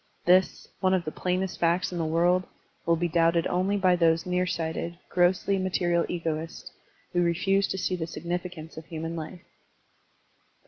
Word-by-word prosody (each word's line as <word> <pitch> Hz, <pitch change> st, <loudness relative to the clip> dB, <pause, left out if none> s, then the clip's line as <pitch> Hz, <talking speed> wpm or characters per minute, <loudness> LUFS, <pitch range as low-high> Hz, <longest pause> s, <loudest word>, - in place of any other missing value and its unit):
This, 185 Hz, +1 st, +3 dB
one 185 Hz, 0 st, +3 dB
of 175 Hz, -3 st, -1 dB
the 155 Hz, -, -3 dB
plainest 185 Hz, +2 st, -2 dB
facts 170 Hz, +2 st, +1 dB
in 175 Hz, -, -4 dB
the 165 Hz, -, 0 dB
world, 175 Hz, +3 st, +2 dB, 0.4 s
will 170 Hz, -, +4 dB
be 175 Hz, +1 st, 0 dB
doubted 165 Hz, 0 st, +2 dB
only 185 Hz, +3 st, +1 dB
by 185 Hz, -2 st, +4 dB
those 165 Hz, -1 st, +2 dB
near 180 Hz, 0 st, 0 dB
sighted, 170 Hz, 0 st, -3 dB
grossly 180 Hz, +2 st, +2 dB
material 175 Hz, -2 st, +1 dB
egoists 165 Hz, -1 st, -4 dB, 0.4 s
who 175 Hz, -, +2 dB
refuse 195 Hz, +4 st, +2 dB
to -, -, -3 dB
see 185 Hz, 0 st, -1 dB
the 165 Hz, -2 st, -4 dB
significance 175 Hz, -2 st, -5 dB
of 160 Hz, -, -8 dB
human 165 Hz, 0 st, -5 dB
life. 165 Hz, +2 st, -7 dB
175 Hz, 165 wpm, -27 LUFS, 165-185 Hz, 0.4 s, will